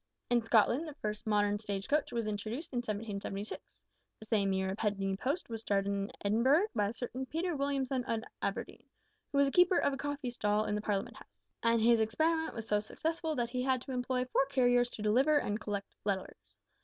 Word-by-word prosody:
In 240 -1 +4
Scotland 230 +7 +3
the 300 - -8
first 215 -3 -4
modern 205 -1 +2
stage 200 -2 -4
coach 300 0 +1
was 230 -2 -1
introduced 215 +8 -4
in - - -1
1776. 210 -3 -4 0.6
The 220 - -10
same 205 -3 +2
year 190 0 0
a - - -3
penny 195 -2 -1
post 280 - -2
was 225 -1 -5
started 200 -2 +1
in 200 0 -2
Edinburgh 260 - +4
by 205 -2 +1
a - - -5
certain 255 +2 -4
Peter 335 +3 -1
Williamson 275 -2 0
of 225 -1 -1 0.2
Aberdeen, - - -3 0.5
who 280 - -1
was 280 0 +5
a - - -1
keeper 360 +2 +5
of 280 - +2
a - - -3
coffee 285 -3 -3
stall 210 -2 +1
in - - -1
the 210 - -1
Parliament 205 -2 -2
House, - - -18 0.2
and 230 0 +3
his 230 +1 +5
experiment 320 +9 +1
was 225 -1 -5
so 210 -1 +2
successful 320 +8 -2
that 240 -2 -1
he 250 0 -1
had 260 0 +2
to - - -7
employ 250 0 -1
four 265 +1 +2
carriers 245 -2 +3
to 215 - -7
deliver 260 +8 +4
and 210 -5 -1
collect 200 -2 -4
letters. 190 - -3
230 Hz, 205 wpm, -33 LUFS, 210-270 Hz, 0.6 s, was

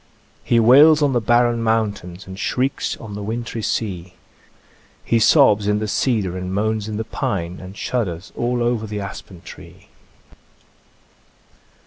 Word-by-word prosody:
He 120 - +2
wails 145 +7 +6
on 140 -2 +2
the 120 - +1
barren 120 +1 +2
mountains, 105 -5 -2
And 95 +1 -10
shrieks 130 +4 -1
on 110 -3 -9
the 105 - -6
wintry 115 +2 -4
sea; 95 -5 -3 0.9
He 115 - +2
sobs 110 -5 +4
in 105 0 +2
the 110 0 -3
cedar 105 -4 0
and 90 0 -5
moans 110 +1 -1
in 105 - -4
the 110 - -2
pine, 90 -5 -4
And 95 +2 -11
shudders 95 -9 -3
all 120 0 -1
over 120 -2 -1
the 105 0 -5
aspen 95 -2 -8
tree." - - -14
110 Hz, 145 wpm, -20 LUFS, 95-120 Hz, 0.9 s, wails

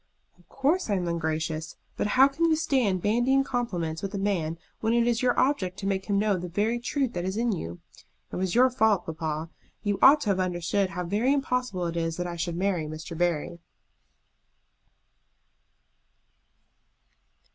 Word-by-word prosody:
"Of 175 - -26
course 290 +4 0
I 205 - +2
am 180 -2 -1
ungracious. 160 -1 -2 0.2
But - - -1
how 265 +1 +8
can 310 +4 0
you 325 -1 +4
stand 250 - +1
bandying 240 +6 +3
compliments 180 -12 -2
with 195 +1 -4
a - - -1
man 180 -5 -1 0.2
when 220 +1 +1
it 235 0 +3
is 235 -1 +1
your 250 -1 +2
object 215 -9 +1
to 195 - -6
make 195 -1 -1
him 200 -1 +1
know 205 -1 +2
the 180 0 -5
very 215 +7 0
truth 260 0 -1
that 175 - -3
is 190 +3 -3
in 235 0 +1
you? 85 - -5 0.5
It - - -5
was 185 +1 -1
your 255 +1 +5
fault, 220 -6 +2
papa. 160 0 -4 0.3
You 205 -2 0
ought 285 +3 +8
to 210 - -1
have 190 - 0
understood 185 +2 0
how 180 +1 -4
very 215 +9 +1
impossible 250 -9 -1
it 170 0 -3
is 165 -1 -1
that 180 - -2
I 175 -1 -4
should 170 0 -3
marry 180 -4 0
Mr. 155 +2 -7
Barry." 170 0 -1
195 Hz, 180 wpm, -27 LUFS, 170-240 Hz, 0.5 s, how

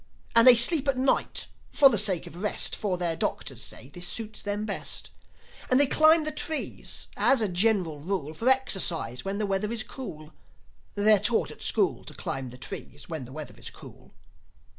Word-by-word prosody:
And 230 +2 +6
they 250 - +11
sleep 275 +5 +5
at 275 -2 0
night, 260 +1 0 0.3
for 280 - +6
the 230 -7 +2
sake 190 -4 +1
of 175 - -11
rest; 210 - +1
For 195 -4 -2
their 170 -2 +1
doctors 130 -5 -4
say 130 - -6
this 175 +4 -3
suits 220 +2 -3
them 205 +1 -3
best. 205 - -2 0.6
And 255 - +3
they 285 - +5
climb 315 +3 +4
the 310 - 0
trees, 310 0 -2
as 270 - +4
a 220 - +1
general 180 -4 0
rule, 160 -2 -4
For 230 +10 -1
exercise, 180 - +1
when 195 +1 -3
the 215 - -1
weather 200 +2 -2
is 230 -2 -1
cool. 155 - -10 0.6
They're 210 0 +4
taught - - 0
at - - -13
school - - 0
To - - -9
climb 135 -1 -4
the 125 - -12
trees 140 +3 -6
when 160 -6 -5
the 125 - -14
weather 155 +1 -8
is - - -5
cool. - - -15
205 Hz, 190 wpm, -26 LUFS, 165-245 Hz, 0.6 s, they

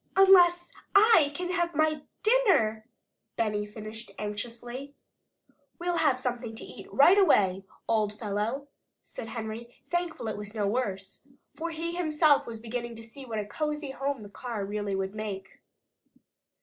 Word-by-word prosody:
"Unless 355 -3 +6 0.2
I 400 -8 +7
can 360 0 -3
have 345 -2 0
my 310 0 +2 0.2
dinner," 370 - +3 0.5
Benny 210 -2 0
finished 215 +1 -8
anxiously. 240 +6 -6 0.8
"We'll 350 0 -1
have 275 -6 +3
something 245 -3 -3
to 225 - -7
eat - - -11
right 355 +8 +6
away, 195 - +4 0.2
old 215 -2 +2
fellow," 220 +6 -2 0.4
said 225 - -8
Henry, 230 +1 -6 0.2
thankful 345 -8 -2
it 215 - -3
was 210 +1 -8
no 210 -2 0
worse. 200 -3 -2 0.3
For 335 +1 -4
he 335 +1 -4
himself 310 -4 +3
was 230 -1 -6
beginning 235 +1 -5
to 225 - -9
see 265 +4 -10
what 225 -2 -4
a 210 - -2
cozy 300 +5 -3
home 275 -3 -3
the 205 - -10
car 220 -1 -5
really 205 -1 -2
would 190 0 -2
make. 200 -3 -6
235 Hz, 150 wpm, -28 LUFS, 215-310 Hz, 0.8 s, I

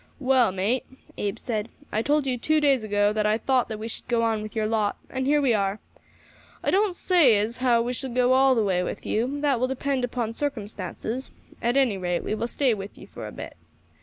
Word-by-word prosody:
"Well, 260 -5 +3
mate," 200 +7 0 0.3
Abe 205 +2 -2
said, 225 -2 -3 0.2
"I 215 - +1
told 295 +3 +1
you 260 -2 0
two 310 +6 +1
days 275 -5 +3
ago 205 0 +2
that 215 0 +1
I 215 +1 +2
thought 255 +1 +1
that 220 - -5
we 220 +1 -5
should 230 - -5
go 235 -2 +1
on 225 -2 +1
with 215 +2 -8
your 220 -1 0
lot, 215 -2 0
and 260 0 -2
here 295 +1 +4
we 270 -5 +3
are. 200 -1 0 0.9
I - - +1
don't 395 -1 +2
say 330 - +4
as 215 +4 -1
how 240 -2 +3
we 245 +1 -2
shall 260 +2 -4
go 250 +1 +3
all 265 0 +5
the 225 - +2
way 185 -2 +1
with 180 - -5
you; 250 +6 -1
that 280 -5 +2
will 255 - +1
depend 265 0 -1
upon 235 -2 -2
circumstances; 230 -2 -4 0.3
at 240 +3 +1
any 240 -8 +2
rate 175 -1 -1
we - - -2
will 230 +2 -2
stay 255 0 +1
with 200 -1 -7
ye - - -11
for - - -8
a - - -8
bit. - - -8
235 Hz, 230 wpm, -25 LUFS, 215-265 Hz, 0.9 s, all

